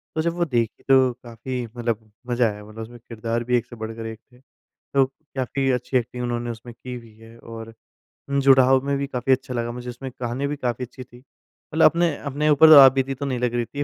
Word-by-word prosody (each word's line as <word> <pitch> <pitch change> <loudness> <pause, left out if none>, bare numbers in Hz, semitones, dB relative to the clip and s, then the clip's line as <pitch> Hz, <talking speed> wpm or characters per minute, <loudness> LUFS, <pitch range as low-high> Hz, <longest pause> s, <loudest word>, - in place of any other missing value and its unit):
तो 160 - +1
जब 170 +1 0
वो 175 -1 +1
देखी 120 -6 -2
तो 130 -2 +5
काफ़ी 120 +1 -5
मतलब 115 -2 -3 0.2
मज़ा 120 -2 +2
आया, 105 0 -10
मतलब 110 +1 -10
उसमें 120 +2 -10
किरदार 115 0 -4
भी 125 +1 +2
एक 120 - -3
से 120 - -12
बढ़कर 115 0 -6
एक 110 0 -7
थे। 125 - -21
तो 135 0 -3
काफ़ी 135 -1 -4
अच्छी 125 +1 0
एक्टिंग 125 +1 -3
उन्होंने 120 0 -2
उसमें 115 +1 -10
की 125 +2 -9
हुई 115 -3 -12
है 115 +1 -15
और 115 -1 -9 0.6
जुड़ाव 135 -1 +5
में 140 0 0
भी 140 - -2
काफ़ी 130 0 -2
अच्छा 130 0 +1
लगा 120 0 -2
मुझे, 125 +1 -7
उसमें 130 +2 -7
गाने 125 +4 -2
भी 145 - -3
काफ़ी 125 -2 -3
अच्छी 130 +2 -11
थी। 120 0 -17 0.6
मतलब 160 - +5
अपने, 170 -3 +3
अपने 145 +2 -1
ऊपर 155 +2 +8
आप 135 -1 +10
बीती 135 0 0
तो 140 - -5
नहीं 130 -3 -2
लग 125 -1 0
रही 120 -1 0
थी। 145 +4 -4
125 Hz, 225 wpm, -23 LUFS, 115-135 Hz, 0.6 s, आप